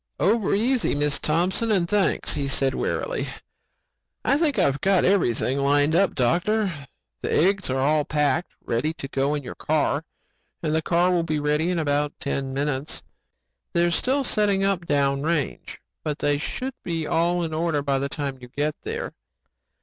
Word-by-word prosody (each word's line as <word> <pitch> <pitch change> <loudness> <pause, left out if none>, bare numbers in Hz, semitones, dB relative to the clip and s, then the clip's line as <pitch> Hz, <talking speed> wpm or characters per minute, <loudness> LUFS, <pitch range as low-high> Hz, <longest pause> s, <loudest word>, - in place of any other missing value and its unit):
"Over 210 +1 +2
easy, 240 - +1
Mrs. 145 -1 +1
Thompson 180 +8 +1
and 185 -5 +2
thanks," 200 -2 +1
he 140 -1 -2
said 135 -1 0
wearily. - - -2 1.0
"I - - +4
think 300 -6 +1
I've 140 -7 +2
got 190 -2 +3
everything 140 - +2
lined 145 +2 +3
up, 195 +2 +3
doctor. 170 - 0 0.3
The - - -2
eggs 195 +1 +2
are 130 - 0
all 150 +3 +2
packed, 150 +2 0 0.2
ready 130 +8 0
to 135 - -6
go 140 +1 0
in 145 - -4
your - - -7
car 150 -1 0 0.6
and 155 -1 0
the 160 - +2
car 175 +3 +2
will 175 -1 +2
be 155 -2 -1
ready 150 +3 +1
in 180 - 0
about 145 -1 0
ten 135 -1 -2
minutes. 140 +1 -2 0.7
They're 170 0 +3
still 265 +10 +1
setting 205 -5 +1
up 185 -4 0
down 140 -1 +2
range 155 -2 -2 0.2
but 150 -1 -2
they 145 -1 +1
should 260 - -4
be 165 -2 -2
all 175 +3 +1
in 160 -1 -3
order 155 -2 0
by 140 -1 +1
the 140 +1 -2
time 140 -2 -4
you 125 - -9
get 145 +4 -1
there. - - -4
155 Hz, 175 wpm, -24 LUFS, 140-180 Hz, 1.0 s, I